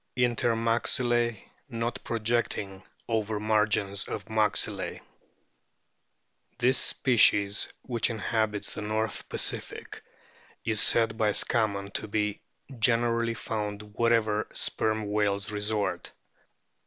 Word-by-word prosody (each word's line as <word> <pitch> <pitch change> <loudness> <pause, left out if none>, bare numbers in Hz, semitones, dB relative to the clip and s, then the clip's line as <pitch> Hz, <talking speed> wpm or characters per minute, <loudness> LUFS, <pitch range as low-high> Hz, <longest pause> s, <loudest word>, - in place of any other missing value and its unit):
Inter 120 -2 +1
maxilke 120 0 +2 0.3
not 115 -1 -4
projecting 110 -4 -2 0.3
over 110 -2 -1
margins 105 -2 +1
of - - -5
maxillae. 110 -2 +3 1.6
This 130 +2 +2
species, 105 -5 +3
which 120 -3 0
inhabits 110 -2 -2
the - - -6
North 110 0 -3
Pacific, - - -4 0.6
is 110 -2 +2
said 115 -1 +4
by 105 -2 +2
Scammon 100 -4 0
to - - -3
be 105 -1 -2 0.4
"generally 115 0 +2
found 105 -1 -5
wherever 110 -2 +1
Sperm 110 -1 -1
whales 100 -1 0
resort." 105 0 -2
110 Hz, 95 wpm, -27 LUFS, 105-115 Hz, 1.6 s, said